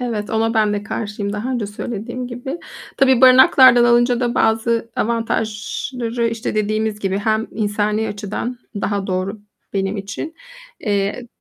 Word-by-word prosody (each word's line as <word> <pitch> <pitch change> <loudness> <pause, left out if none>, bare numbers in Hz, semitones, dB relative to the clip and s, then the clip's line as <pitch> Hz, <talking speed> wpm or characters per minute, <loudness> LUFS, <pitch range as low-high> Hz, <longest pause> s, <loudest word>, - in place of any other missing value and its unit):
Evet, 225 -4 -3
ona 225 +1 +1
ben 215 -2 +3
de 205 - -2
karşıyım 210 -1 -4
daha 210 +5 -3
önce 240 -5 -2
söylediğim 235 +4 -5
gibi. 250 +6 -6 0.4
Tabii, 260 -2 +4
barınaklardan 255 -1 +7
alınca 240 +1 +3
da 240 -1 0
bazı 230 +1 +1
avantajları, 230 +1 -2
işte, 230 -1 -3
dediğimiz 215 0 0
gibi, 195 -1 -1
hem 220 +1 0
insani 210 0 -1
açıdan 210 +4 -4 0.2
daha 200 -1 -1
doğru 190 +2 -2 0.3
benim 195 +1 -1
için, 200 +11 -6 0.5
eee, 205 +3 -1
220 Hz, 135 wpm, -19 LUFS, 205-240 Hz, 0.5 s, barınaklardan